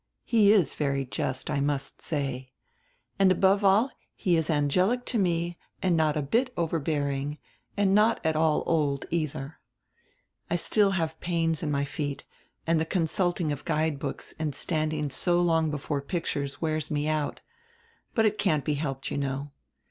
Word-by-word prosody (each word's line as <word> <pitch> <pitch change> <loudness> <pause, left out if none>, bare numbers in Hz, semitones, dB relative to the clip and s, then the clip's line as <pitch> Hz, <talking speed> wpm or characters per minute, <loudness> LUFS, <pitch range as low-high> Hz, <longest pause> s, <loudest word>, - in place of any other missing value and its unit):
He 210 -3 +5
is 190 -10 +3
very 140 -2 -1
just, 130 0 -3
I 145 - 0
must 140 -1 -2
say. 135 -4 -3 0.7
And 195 -1 +6
above 195 +2 +3
all 205 +7 +4 0.2
he 180 -3 +1
is 160 -1 0
angelic 180 - +2
to 235 - 0
me 170 -2 0 0.2
and 180 -2 +2
not 155 -1 +2
a 150 - 0
bit 235 - +1
overbearing 145 -3 -1 0.4
and 200 -1 +3
not 215 +2 +4
at 160 -1 +2
all 155 -1 +2
old, 145 -4 +1
eitiier. 155 -3 -3 0.9
I 175 - +1
still 200 +4 +3
have 160 -2 -2
pains 165 -2 0
in 155 - -2
my 140 -1 0
feet, 145 0 -4 0.4
and 165 -1 +2
die 160 - 0
consulting 175 -1 0
of 145 -1 -4
guide 155 -2 0
books 140 -1 -5
and 150 -3 -2
standing 155 -2 -1
so 175 +6 +2
long 165 -2 +2
before 145 -1 -2
pictures 140 -3 -3
wears 155 -2 -1
me 150 0 -1
out. 155 -1 -1 0.7
But 225 - +4
it 215 0 +1
can't 155 -8 +1
be 150 - +1
helped, 135 -2 -3
you - - -1
know. 140 +1 -3
155 Hz, 165 wpm, -27 LUFS, 145-175 Hz, 0.9 s, And